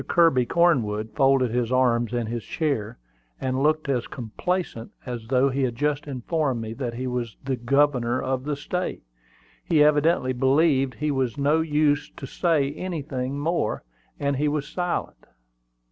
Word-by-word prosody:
Kirby 150 -8 +4
Cornwood 110 -11 +2
folded 135 +1 +3
his 120 0 -1
arms 120 -2 +2
in 120 -1 -1
his 115 0 -4
chair, 135 -10 -2 0.4
and 130 0 -1
looked 155 +1 +2
as 130 -4 0
complacent 125 - -3
as 120 -3 -6
though 130 +2 +3
he 135 +2 -1
had 125 -3 0
just 145 +2 -1
informed 135 0 -1
me 110 0 -5
that 120 -1 -4
he 130 +2 -4
was 125 -4 -3
the 135 0 -1
governor 125 -1 +2
of 130 -1 -2
the 150 -1 -1
State. 180 +6 -4 0.6
He 155 -3 +4
evidently 150 -3 +3
believed 135 +1 +2
it 150 0 0
was 130 -5 -1
no 145 +3 +2
use 150 -2 +1
to - - -6
say 145 -1 +1
anything 140 -6 -4
more, 155 -6 -1 0.4
and 140 -1 0
he 150 +2 +1
was 145 -1 -1
silent. 175 +1 -3
135 Hz, 160 wpm, -25 LUFS, 125-150 Hz, 0.6 s, Kirby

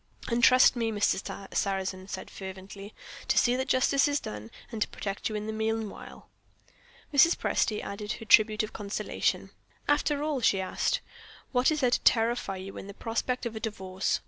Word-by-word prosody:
"And 235 0 0
trust 255 +2 +7
me," 230 -2 0
Mr. 200 -1 -1
Sarrazin 190 -1 -1
said - - -7
fervently, 195 +2 -9 0.3
"to - - +1
see 245 0 +4
that 260 +1 -2
Justice 275 +2 +3
is 290 0 +1
done, 105 +1 -7 0.2
and 225 - -5
to - - +2
protect 200 +1 -4
you 215 - -4
in 210 0 -3
the 220 - -4
meanwhile." 220 -1 -4 0.9
Mrs. 330 +5 +6
Presty 215 -3 0
added 205 +2 -4
her 225 - -9
tribute 215 0 +5
of 215 - -6
consolation. 205 -1 -2 0.4
"After 290 0 +1
all," 300 -4 -1
she 200 -4 +3
asked, 190 - -1 0.5
"what 250 0 +3
is 310 -1 0
there 250 -2 +3
to - - +3
terrify 225 -4 +2
you 190 +1 -8
in - - -8
the 200 - -9
prospect 245 +2 -2
of 230 -1 -4
a - - -4
Divorce? 190 -3 -2
220 Hz, 180 wpm, -28 LUFS, 195-250 Hz, 0.9 s, trust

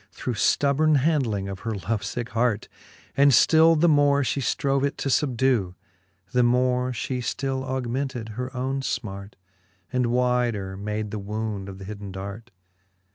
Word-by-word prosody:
Through 125 - -4
ftubborne 145 +6 +3
handling 130 -9 +1
of 95 -1 -6
her 110 0 -3
love 100 +3 -2
ficke 120 -3 -4
hart; 115 0 0 0.5
And 140 +1 +6
ftill 160 +5 +5
the 175 - +4
more 145 -2 +4
fhe 135 +2 -1
ftrove 135 +2 0
it 140 - -1
to 140 - -2
fubdew, 125 -8 +1 0.6
The 125 - +3
more 125 +1 +2
fhe 125 +1 -3
ftill 135 +2 -2
augmented 130 -2 -3
her 125 +4 -4
owne 135 +2 -1
fmart. 100 -6 -4 0.6
And 125 -1 +1
wyder 120 -5 0
made 105 +1 -4
the 110 - -4
wound 105 -1 -4
of 95 - -9
th 95 -1 -10
hidden 100 -1 -7
dart. 100 +5 -7
125 Hz, 155 wpm, -25 LUFS, 105-135 Hz, 0.6 s, And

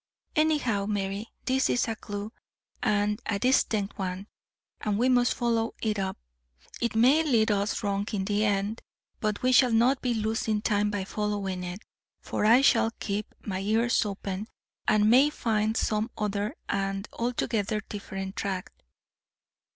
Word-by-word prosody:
Anyhow, 290 -10 +2
Mary, 200 +1 -2 0.2
this 265 +1 +2
is 245 - +1
a 225 - -2
clue, 205 0 -6 0.5
and 210 +1 +1
a 205 - 0
distinct 215 -4 +1
one, 185 0 -3 0.5
and 210 -1 -1
we 245 +4 +3
must 245 -1 +3
follow 230 -1 0
it 215 -2 -1
up. 190 -1 -2 0.6
It 235 -1 0
may 260 +8 +5
lead 230 -8 +3
us 205 +1 0
wrong 200 0 -1
in 195 -3 -1
the 205 +1 +1
end, 205 +1 0 0.4
but 215 -1 -2
we 255 - +4
shall 255 -1 +6
not 245 +4 +3
be 245 -2 0
losing 220 0 0
time 210 -2 +2
by 205 -2 -2
following 200 -3 -2
it, 180 +3 -6 0.4
for - - -2
I 235 +4 +7
shall 225 -4 +4
keep 205 +1 -3
my 190 -3 -2
ears 225 +5 +2
open, 200 0 -4 0.4
and 210 0 +4
may 260 +6 +6
find 220 -5 0
some 215 +2 0
other 210 +4 -2
and 195 +1 -2
altogether 225 -3 -1
different 195 -2 -6
track." 190 -2 -3
210 Hz, 150 wpm, -28 LUFS, 200-230 Hz, 0.6 s, I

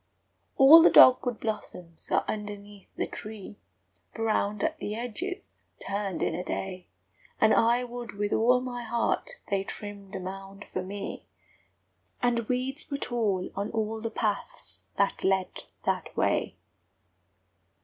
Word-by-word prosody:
All 290 +5 +10
the - - +7
dog 255 - +8
wood 245 -3 -2
blossoms 180 -6 -5
are - - +2
underneath 205 -1 -6
the - - -1
tree, 210 -1 -8 0.6
Browned 215 -1 0
at 320 -1 -1
the 210 - -3
edges, 245 - -6 0.2
turned 200 -2 -3
in - - 0
a 175 +2 -3
day; 185 -1 -4 0.5
And 220 - +5
I 235 +2 +4
would 245 -2 -7
with 205 0 -1
all 250 +3 +4
my 245 -1 -5
heart 235 - 0 0.2
they 195 -1 +1
trimmed 200 0 -6
a - - -3
mound 195 +2 -8
for 185 - -4
me, 195 +2 -6 0.9
And 235 -2 0
weeds 260 +5 -2
were 280 - -2
tall 215 -9 -1
on 200 +1 -2
all 220 0 -2
the 230 - -2
paths 215 -2 -2
that 200 0 0
led 190 -1 0 0.2
that - - -2
way! - - +1
215 Hz, 140 wpm, -28 LUFS, 200-245 Hz, 0.9 s, All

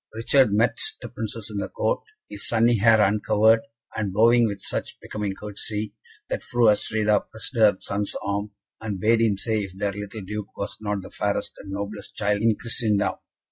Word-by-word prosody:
Richard 120 +1 +4
met 110 +4 +2 0.2
the - - -7
Princes - - -5
in - - -5
the - - -3
court, - - 0 0.3
his 105 -1 -3
sunny 115 0 +3
hair 110 +1 +6
uncovered, 105 +2 +4 0.4
and 105 -3 -1
bowing 115 +4 +5
with 100 -2 -5
such - - -4
becoming 105 -2 -4
courtesy, 105 0 -4 0.3
that - - -2
Fru 120 -2 +3
Astrida 105 0 +2
pressed 110 +4 -6
her 110 -4 +5
son's 100 0 -3
arm, 100 +1 -1 0.3
and 105 -3 -4
bade 115 +2 +3
him 110 -4 +3
say 110 +2 0
if 95 -2 -7
their 100 0 0
little 105 +2 -6
Duke 105 +2 -6
was 100 +2 -4
not 105 -2 -2
the - - -11
fairest - - -1
and 100 - -10
noblest 100 +1 -5
child 105 -1 0
in 110 -1 +3
Christendom. 110 -3 +1
105 Hz, 180 wpm, -25 LUFS, 100-115 Hz, 0.4 s, hair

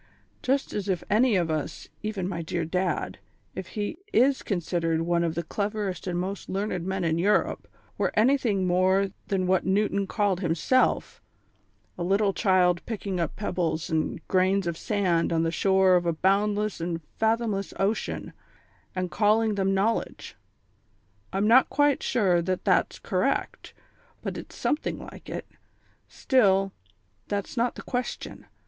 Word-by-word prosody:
Just 270 +2 0
as 205 -1 -3
if 185 -2 0
any 230 +1 +4
of 170 -3 +1
us, 155 -2 -4
even 210 -4 -3
my 170 -3 -3
dear 165 0 -2
Dad, 180 +2 -2 0.3
if - - -6
he 205 -1 -2
is 270 -5 +3
considered 165 -3 -1
one 170 0 +1
of 165 -1 -1
the 170 - -2
cleverest 200 +1 -3
and 175 -1 -1
most 190 +2 -4
learned 190 -2 -2
men 190 -1 -1
in 165 0 +1
Europe, 205 +4 +1 0.3
were - - +2
anything 225 -4 +3
more 185 +2 +3 0.2
than 190 -2 0
what 185 0 +2
Newton 200 0 +1
called 200 -4 0
himself 175 +9 +1 0.8
a - - -1
little 195 +2 +2
child 180 -4 +3
picking 200 -5 -3
up 165 -3 -2
pebbles 175 -4 -2
and 160 -1 -2
grains 190 +1 +2
of 170 -1 -1
sand 180 -4 0
on 165 -1 +2
the 165 - 0
shore 190 +1 +4
of 175 -1 +1
a 170 - +2
boundless 205 +3 +1
and 165 -1 -2 0.2
fathomless 220 -3 0
ocean, 200 +3 -1 0.6
and 185 -1 -2
calling 215 +1 +3
them 195 -1 +1
knowledge. 215 +4 -1 1.0
I'm 195 +2 +1
not 245 +4 +6
quite 290 -1 +2
sure 190 -8 +2
that 185 +1 -2
that's - - +2
correct, - - -2 0.5
but - - -3
it's - - -9
something 300 - -1
like - - -11
it. - - -5 0.6
Still, 195 -7 +2 0.6
that's 205 +3 -3
not 240 0 0
the - - -8
question. 250 0 -4
190 Hz, 150 wpm, -26 LUFS, 175-210 Hz, 1.0 s, not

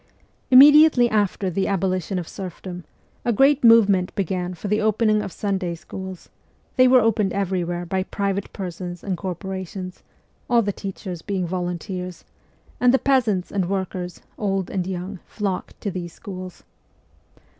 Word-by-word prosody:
Immediately 280 -2 +8
after 205 -2 0
the 190 +3 0
abolition 190 -1 -1
of 175 -2 -4
serfdom, 180 -2 -7 0.4
a 240 - +1
great 270 +5 +4
movement 205 -6 +5
began 180 -1 -2
for 190 - -6
the 210 +2 +1
opening 215 0 +2
of 195 - -5
Sunday 190 -4 -2
schools; 190 +2 -8 0.5
they 255 0 +6
were 255 0 +6
opened 215 -3 +1
every 190 -2 0
where 175 +1 -3
by 190 +2 -1
private 200 +1 -2
persons 180 -2 -6
and 195 -2 -2
corporations 185 0 -6 0.5
all 235 -2 +4
the 205 -1 -1
teachers 185 -3 -6
being 190 -2 -2
volunteers 180 +1 -4 0.6
and 250 0 +5
the 265 - +5
peasants 235 -10 +1
and 190 -3 -1
workers, 185 -2 -3 0.2
old 195 -3 -1
and 185 -2 -2
young, 185 +1 -5
flocked 200 -4 -4
to 200 - -2
these 175 -2 -6
schools. 185 -3 -9
190 Hz, 145 wpm, -23 LUFS, 180-210 Hz, 0.6 s, Immediately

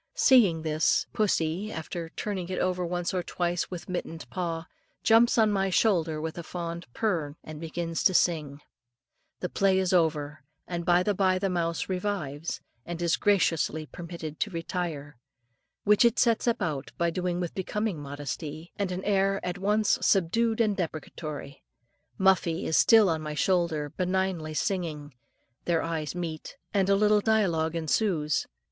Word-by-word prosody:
Seeing 200 -12 +5
this, 155 0 +2
pussy, 195 -1 0
after 165 0 -5
turning 185 -1 -4
it 185 - -3
over 180 0 0
once 175 +1 -2
or 185 - 0
twice 175 0 -2
with 180 -2 -7
mittened 170 -3 -5
paw, 170 -2 -3 0.4
jumps 230 +2 +5
on 220 -2 +4
my 195 -1 +1
shoulder 170 -6 +2
with 160 +2 -4
a - - -5
fond 170 0 -5
"purr 175 - 0
rn," 145 - -12
and 155 0 -9
begins 165 0 -3
to 185 - +5
sing. 150 -5 +1 0.8
The 180 - -2
play 195 +1 +2
is 190 -1 +1
over, 150 -5 +1 0.3
and 170 -1 -4
by 175 0 +4
and 205 - +1
by 185 -1 +3
the 195 0 -1
mouse 170 -2 -1
revives, 180 -6 -3 0.2
and 170 +4 -6
is 170 -1 +2
graciously 165 -6 +1
permitted 170 -2 -8
to 215 - 0
retire, 165 -5 -4 0.7
which 210 +2 +5
it 235 0 +4
sets 230 0 +2
about 165 - -1 0.2
doing 180 0 -1
with 175 -2 -3
becoming 205 -1 -2
modesty, 145 +3 -6
and 195 -2 -1
an 180 +1 -4
air 195 -1 +2
at 180 +2 -3
once 210 +2 +2
subdued 220 +5 +2
and 215 -3 +2
deprecatory. 155 -4 -5 0.6
Muffie 185 -3 +2
is 160 - 0
still 220 -3 +6
on 160 -3 0
my 150 -1 -5
shoulder, 165 -4 +1
benignly 185 -4 -1
singing. 155 -6 -2 0.5
Their 170 -2 +1
eyes 160 -1 -3
meet, 165 -3 -5 0.2
and 195 -2 +2
a 200 - +5
little 210 +1 +4
dialogue 175 -8 +1
ensues. 160 -2 0
175 Hz, 155 wpm, -28 LUFS, 160-195 Hz, 0.8 s, still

